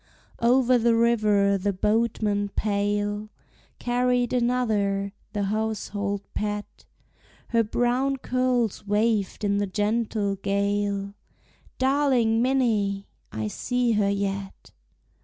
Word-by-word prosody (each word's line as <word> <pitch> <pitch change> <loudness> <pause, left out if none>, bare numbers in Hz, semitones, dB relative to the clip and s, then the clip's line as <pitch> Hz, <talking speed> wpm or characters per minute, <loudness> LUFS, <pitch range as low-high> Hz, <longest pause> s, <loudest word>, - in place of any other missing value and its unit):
Over 250 +1 +4
the 230 0 +3
river 210 -4 +3
the 200 +1 0
boatman 210 0 0
pale 205 0 -1 0.5
Carried 245 0 +1
another, 215 -5 0 0.2
the 205 -2 -1
household 205 -1 -2
pet; 210 0 -4 0.6
Her 230 -1 +3
brown 245 +5 0
curls 250 -5 0
waved 210 -1 0
in 200 0 +1
the 205 - 0
gentle 210 0 -1
gale, 200 0 -1 0.6
Darling 260 -4 +2
Minnie! 220 -7 +1 0.2
I 110 0 -3
see 245 - 0
her 210 -2 +2
yet. 195 -1 -3
210 Hz, 100 wpm, -25 LUFS, 200-240 Hz, 0.6 s, Over